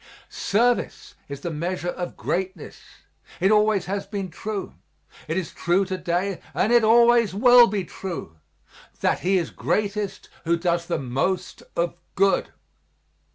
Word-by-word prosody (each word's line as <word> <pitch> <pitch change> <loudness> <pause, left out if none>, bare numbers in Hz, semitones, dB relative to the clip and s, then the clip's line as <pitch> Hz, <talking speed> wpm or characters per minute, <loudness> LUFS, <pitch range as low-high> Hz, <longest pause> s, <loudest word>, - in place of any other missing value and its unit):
Service 240 +4 0 0.2
is 140 -1 -7
the 170 - -4
measure 175 +3 -3
of 175 0 -5
greatness; 185 -2 -4 0.6
it 190 +3 +3
always 210 -2 +3
has 195 +1 -3
been 195 -3 -4
true; 205 +4 -5 0.5
it 160 +3 -2
is 180 -5 -3
true 180 +3 +1
to 190 0 -3
day, 180 +1 -2
and 225 - +2
it 240 -1 +5
always 235 -2 +5
will 245 +2 +7
be 195 -1 -2
true, 170 - -7 0.6
that - - +1
he 190 +2 +2
is 170 -3 -2
greatest 205 -1 -2 0.2
who 170 +1 +1
does 170 0 -1
the 175 - -1
most 135 +9 -2
of 170 0 0 0.2
good. 195 +1 +2
190 Hz, 145 wpm, -24 LUFS, 175-210 Hz, 0.6 s, will